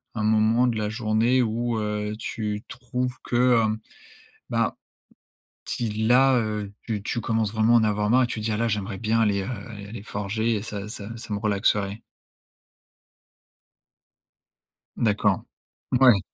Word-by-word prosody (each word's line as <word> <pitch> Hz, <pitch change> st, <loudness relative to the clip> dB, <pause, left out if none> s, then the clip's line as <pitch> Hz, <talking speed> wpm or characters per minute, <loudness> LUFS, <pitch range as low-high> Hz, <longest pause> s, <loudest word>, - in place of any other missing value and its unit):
un 105 Hz, -, -1 dB
moment 110 Hz, +3 st, +3 dB
de 115 Hz, -2 st, 0 dB
la 105 Hz, -1 st, -1 dB
journée 115 Hz, +3 st, +2 dB
où, 115 Hz, 0 st, -1 dB
heu, 105 Hz, 0 st, -2 dB
tu 105 Hz, -1 st, -4 dB
trouves 125 Hz, +1 st, -3 dB
que, 120 Hz, -1 st, +4 dB
hem, 110 Hz, 0 st, 0 dB, 0.7 s
bah, -, -, +1 dB, 0.9 s
si 115 Hz, -2 st, -2 dB, 0.2 s
là, 130 Hz, +2 st, +5 dB
heu, 105 Hz, -2 st, -3 dB
tu 105 Hz, -4 st, -3 dB
tu 120 Hz, -, -2 dB
commences 110 Hz, -2 st, 0 dB
vraiment 110 Hz, +1 st, +3 dB
à -, -, +7 dB
en -, -, +2 dB
avoir 105 Hz, 0 st, +1 dB
marre 130 Hz, +2 st, +5 dB
et -, -, +1 dB
tu 115 Hz, -, -4 dB
dis: 110 Hz, +1 st, -2 dB
«Ah -, -, -1 dB
là, 115 Hz, 0 st, +1 dB
j'aimerais 100 Hz, -1 st, -2 dB
bien 115 Hz, 0 st, +1 dB
aller, 100 Hz, -3 st, +2 dB
heu, 95 Hz, -, -5 dB, 0.2 s
aller 100 Hz, -2 st, -8 dB
aller 105 Hz, -1 st, -8 dB
forger 110 Hz, +3 st, -1 dB
et 100 Hz, -, -2 dB
ça 105 Hz, -2 st, -5 dB
ça 105 Hz, -1 st, -7 dB
ça 110 Hz, -2 st, -6 dB
me 100 Hz, -, -1 dB
relaxerait»? 100 Hz, 0 st, 0 dB, 3.0 s
D'accord, 105 Hz, -3 st, +2 dB, 0.5 s
mouais. 125 Hz, -6 st, +6 dB
110 Hz, 160 wpm, -25 LUFS, 105-115 Hz, 3.0 s, à